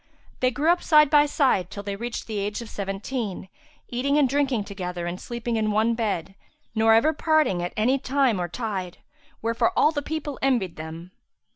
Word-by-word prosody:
They 255 - +3
grew 295 +6 +2
up 350 - +1
side 300 -2 +5
by 295 -1 +6
side 260 - +1
till 200 - -7
they 200 -1 -4
reached 235 +3 -5
the 215 -2 -3
age 205 +3 -2
of 225 - -11
seventeen, 200 0 -4 0.4
eating 275 +4 0
and 290 -3 +4
drinking 270 -4 +1
together 180 -3 -5
and 175 +1 -5
sleeping 235 -1 -3
in 215 -1 +1
one 220 +2 +2
bed, 200 -6 -2 0.4
nor 225 0 +4
ever 305 +8 +4
parting 305 - +2
at 175 - -3
any 250 +6 +2
time 260 -7 +1
or 175 - -1
tide; 190 -3 -4 0.5
wherefore 230 +9 +1
all 305 - +5
the 290 -2 -2
people 295 -1 -5
envied 240 -11 +1
them. 160 +3 -8
230 Hz, 185 wpm, -25 LUFS, 195-275 Hz, 0.5 s, by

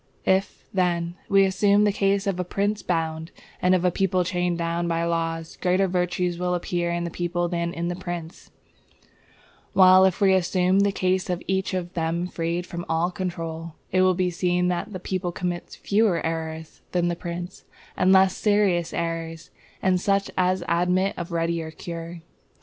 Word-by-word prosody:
If, 190 +1 0
then, 175 -2 0 0.2
we 195 -1 +5
assume 200 +2 +3
the 205 - +3
case 195 0 +1
of 195 -3 -1
a - - +1
prince 200 +3 -1
bound, 160 -2 -2 0.3
and 180 +1 +4
of 180 0 0
a 180 - +4
people 185 0 +1
chained 175 0 -1
down 170 0 -1
by 165 0 0
the - - 0
laws, 165 -1 -2
greater 185 +1 +2
virtue 180 -1 0
will 180 0 0
appear 175 0 -1
in 170 0 -1
the 170 - -4
people 175 0 -1
than 170 -1 -2
in 170 0 -3
the 175 - -2
prince; 175 -2 -7 1.2
while 185 -1 +7
if 190 -2 +1
we 195 -2 +5
assume 185 +1 +2
the 200 0 +3
case 185 -1 0
of 180 0 -2
each 190 0 -1
of 175 -1 -4
them 165 0 -1
freed 170 0 -2
from 175 -1 -6
all 165 +2 +1
control, 165 -4 -5 0.2
it 185 - +3
will 185 -1 +4
be 180 0 0
seen 180 0 +1
that 180 +4 -2
the 185 - -5
people 185 0 -3
commits 175 0 -4
fewer 205 -4 +1
errors 160 -1 -4
than 175 -1 +2
the 175 - 0
prince, 175 +1 -7 0.3
and 185 +1 +3
less 190 -1 +5
serious 200 -5 +2
errors, 165 -1 -4 0.3
and 185 -1 +2
such 195 0 +1
as 185 0 +1
admit 180 +3 +2
of 175 0 -6
readier 165 -1 -1
cure. 170 +1 -7
180 Hz, 180 wpm, -24 LUFS, 170-185 Hz, 1.2 s, while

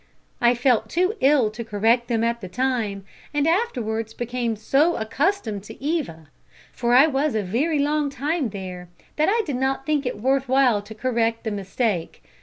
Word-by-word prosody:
I 240 0 +4
felt 245 -1 +2
too 365 +4 +1
ill 265 -5 +4
to 225 +2 -6
correct 225 +3 +1
them 230 -2 0
at 235 0 0
the 185 - -6
time, 220 -3 -2 0.3
and 295 +1 +2
afterwards 225 - -1
became 240 -1 -2
so 275 +10 +2
accustomed 225 - -1
to 220 - -11
Eva 265 - -3 0.4
for 240 0 +1
I 265 +4 +8
was 285 -2 0
a 215 - 0
very 270 - 0
long 295 0 +1
time 280 0 -1
there 185 -3 -7 0.3
that 310 +3 +3
I 450 +2 +2
did 280 -5 -2
not 270 +1 -1
think 290 -3 0
it 245 - -4
worth 265 +2 +1
while 255 -5 +4
to 215 +2 -11
correct 230 -1 0
the 220 - -2
mistake. 200 -2 -2
245 Hz, 180 wpm, -23 LUFS, 220-285 Hz, 0.4 s, I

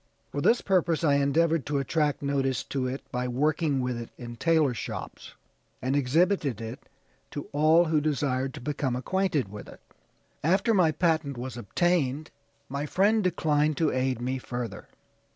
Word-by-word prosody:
For 145 - -2
this 235 +10 +4
purpose 170 -4 +1
I 145 -3 +4
endeavored 160 +2 +2
to 145 -1 0
attract 145 +1 0
notice 135 -2 0
to 130 -2 -2
it 130 +2 -4
by 125 -1 -2
working 145 +2 +1
with 125 -1 -2
it 115 - -8
in 120 -1 -8
tailor 160 -1 +2
shops, - - -7 0.4
and 130 +2 -1
exhibited 145 - +2
it 115 +3 -8 0.4
to 145 - -6
all 155 +4 +4
who 155 -2 +2
desired 135 -3 -1
to 145 - -8
become 135 -2 -2
acquainted 155 - 0
with 105 +1 -9
it. - - -13 0.6
After 190 - +3
my 180 -6 +4
patent 155 -5 0
was 125 0 -5
obtained, 145 - 0 0.4
my 140 +2 -3
friend 210 +6 +3
declined 155 -4 +1
to 160 -2 +2
aid 130 -1 0
me 130 +2 -2
further. 120 -5 -6
145 Hz, 160 wpm, -27 LUFS, 130-160 Hz, 0.6 s, this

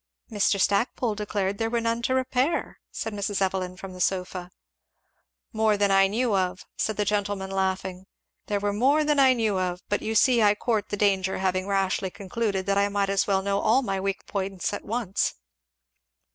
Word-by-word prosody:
"Mr. 205 -1 +2
Stackpole 220 +3 +1
declared 200 -1 -2
there 225 0 0
were 235 0 0
none 230 0 -1
to 260 +2 0
repair," 260 +4 0
said 225 - -5
Mrs. 200 -1 -2
Evelyn 185 -1 -1
from 195 -1 -8
the 180 - -7
sofa. 180 -1 -1 1.0
"More 220 -1 +2
than 200 -1 +2
I 195 0 +5
knew 225 +2 0
of," 185 -1 -1
said 220 - -1
the 210 - +1
gentleman 200 -1 -1
laughing 190 -1 -2 0.4
"there 205 -1 0
were 205 0 -1
more 275 +8 +3
than 300 -1 +2
I 265 -1 +6
knew 220 -5 0
of; 180 -1 -2
but 205 - 0
you 220 +1 -3
see 240 +1 +5
I 205 -1 +5
court 220 -1 -1
the 205 - -3
danger, 195 -2 +1
having 185 0 -1
rashly 195 -1 0
concluded 195 0 -3
that 200 0 +2
I 200 0 +2
might 200 -1 0
as 195 -1 +1
well 195 -1 +1
know 200 0 0
all 250 +7 +3
my 195 -4 -2
weak 195 0 -3
points 195 -1 -3
at - - -5
once." 220 -3 -1
200 Hz, 190 wpm, -26 LUFS, 190-220 Hz, 1.0 s, I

